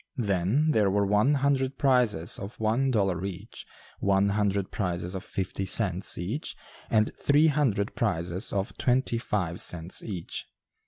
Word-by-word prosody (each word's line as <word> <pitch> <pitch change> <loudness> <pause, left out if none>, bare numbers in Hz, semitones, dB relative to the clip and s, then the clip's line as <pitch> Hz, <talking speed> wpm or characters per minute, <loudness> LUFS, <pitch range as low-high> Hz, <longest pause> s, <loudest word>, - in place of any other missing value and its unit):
Then 105 - +1
there 105 -7 +3
were 100 +1 +2
one 105 +8 +3
hundred 135 -1 +1
prizes 120 - +2
of 100 +3 -8
one 115 +5 +1
dollar 95 -7 0
each, 95 -3 -7 0.3
one 100 0 +2
hundred 100 -1 0
prizes 90 -2 -3
of 95 - -5
fifty 95 +1 -4
cents 95 -1 +1
each, 105 - -4 0.3
and 110 -1 +2
three 145 +2 +3
hundred 125 -9 0
prizes 90 -2 -1
of 95 -1 -2
twenty 125 -2 +1
five 90 -7 -2
cents 85 +1 -1
each. 95 -7 -5
100 Hz, 145 wpm, -27 LUFS, 95-125 Hz, 0.3 s, there